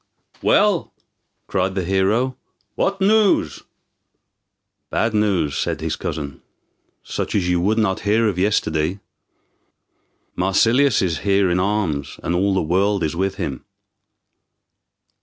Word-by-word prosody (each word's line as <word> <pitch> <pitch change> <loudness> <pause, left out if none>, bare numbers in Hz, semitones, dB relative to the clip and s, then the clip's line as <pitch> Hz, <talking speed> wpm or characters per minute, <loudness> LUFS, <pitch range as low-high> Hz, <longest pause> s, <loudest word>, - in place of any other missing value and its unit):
"Well," - - +2 0.5
cried 95 0 -1
the 95 - -1
hero, 100 +8 +1 0.4
"what 195 0 -1
news?" 210 0 +2 1.3
"Bad 110 0 0
news," 100 -9 +1
said - - -2
his - - -2
cousin, 70 -3 -5 0.6
"such - - -4
as 95 -4 +1
you 90 -1 +1
would 105 +5 +1
not 105 -4 +1
hear 110 +2 +2
of 95 -4 -2
yesterday. 90 -3 0 1.4
Marsilius 115 +8 +3
is 85 -4 -1
here 100 -2 +2
in 90 - +1
arms, 90 -8 -1
and 85 - -1
all 95 +2 +1
the 95 - +1
world 95 +3 +1
is 80 0 -1
with 95 +2 -1
him." 75 -10 -4
95 Hz, 120 wpm, -21 LUFS, 90-105 Hz, 1.4 s, Marsilius